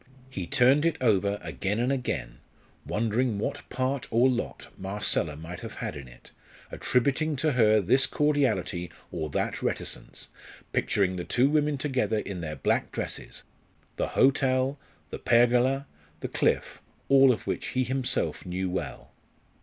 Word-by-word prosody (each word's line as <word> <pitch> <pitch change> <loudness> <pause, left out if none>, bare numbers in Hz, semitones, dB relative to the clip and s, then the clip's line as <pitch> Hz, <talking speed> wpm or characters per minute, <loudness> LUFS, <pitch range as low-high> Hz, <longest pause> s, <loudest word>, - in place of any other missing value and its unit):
He 95 -8 -4
turned 140 +2 +4
it 165 -1 +1
over 100 -4 +2
again 90 +6 -2
and 125 +3 +1
again, 125 - -3 0.5
wondering 115 +1 0
what 135 +7 -4
part 130 +1 -2
or 120 +3 +4
lot 125 -2 -3
Marcella 95 -5 -1
might 80 +3 -8
have - - -8
had - - -4
in 70 -3 -8
it, - - -16 0.4
attributing 140 +5 +1
to 155 +3 +1
her 110 -4 +4
this 130 +8 +3
cordiality 110 - 0 0.2
or 80 -3 -3
that - - -2
reticence; - - -4 0.4
picturing 95 -2 +1
the 90 - -3
two 130 +9 +2
women 150 -1 +2
together 130 -6 0
in 100 -4 -4
their 75 -2 -4
black 70 - 0
dresses - - -6 0.5
the - - 0
hotel, 135 0 +3 0.3
the - - -5
pergola, 125 +3 +3 0.4
the - - -2
cliff - - 0 0.3
all 135 -1 +7
of 120 - -3
which - - -2
he 130 - 0
himself 130 +1 -1
knew 90 +1 -3
well. 95 - -5
120 Hz, 145 wpm, -27 LUFS, 95-135 Hz, 0.5 s, all